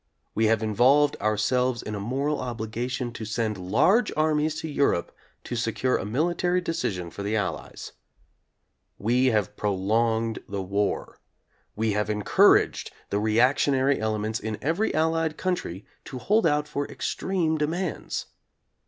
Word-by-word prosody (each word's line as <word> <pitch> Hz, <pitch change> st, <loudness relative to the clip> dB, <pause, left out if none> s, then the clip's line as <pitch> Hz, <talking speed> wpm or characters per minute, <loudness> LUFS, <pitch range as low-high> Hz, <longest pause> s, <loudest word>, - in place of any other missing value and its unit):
We 110 Hz, +1 st, +2 dB
have 110 Hz, 0 st, +2 dB
involved 130 Hz, +7 st, +4 dB
ourselves 120 Hz, +4 st, +1 dB
in 105 Hz, -, -5 dB
a 105 Hz, -, -3 dB
moral 135 Hz, +8 st, -1 dB
obligation 120 Hz, +1 st, -3 dB
to 115 Hz, -, -7 dB
send 110 Hz, 0 st, -1 dB
large 150 Hz, -, +3 dB
armies 155 Hz, 0 st, +1 dB
to -, -, -4 dB
Europe 140 Hz, -, +1 dB, 0.3 s
to -, -, -5 dB
secure 120 Hz, +2 st, 0 dB
a -, -, -2 dB
military 175 Hz, +8 st, +1 dB
decision 95 Hz, -, -3 dB
for -, -, -7 dB
the 105 Hz, +2 st, -1 dB
Allies. 105 Hz, -3 st, -4 dB, 1.1 s
We 125 Hz, +5 st, +2 dB
have 105 Hz, -6 st, +1 dB
prolonged 110 Hz, +3 st, 0 dB
the 100 Hz, -1 st, -3 dB
war. 100 Hz, +2 st, -2 dB, 0.6 s
We 110 Hz, 0 st, 0 dB
have 105 Hz, +1 st, -1 dB
encouraged 105 Hz, -2 st, +3 dB, 0.2 s
the 100 Hz, -, +1 dB
reactionary 130 Hz, +5 st, +3 dB
elements 110 Hz, 0 st, -1 dB
in 110 Hz, 0 st, -4 dB
every 165 Hz, +10 st, 0 dB
Allied 160 Hz, 0 st, +1 dB
country 175 Hz, -, -3 dB, 0.2 s
to 130 Hz, -, -7 dB
hold 205 Hz, -, +2 dB
out 150 Hz, -1 st, +1 dB
for 145 Hz, -1 st, -3 dB
extreme 165 Hz, -5 st, -1 dB
demands. 165 Hz, +3 st, -2 dB
120 Hz, 135 wpm, -26 LUFS, 105-150 Hz, 1.1 s, involved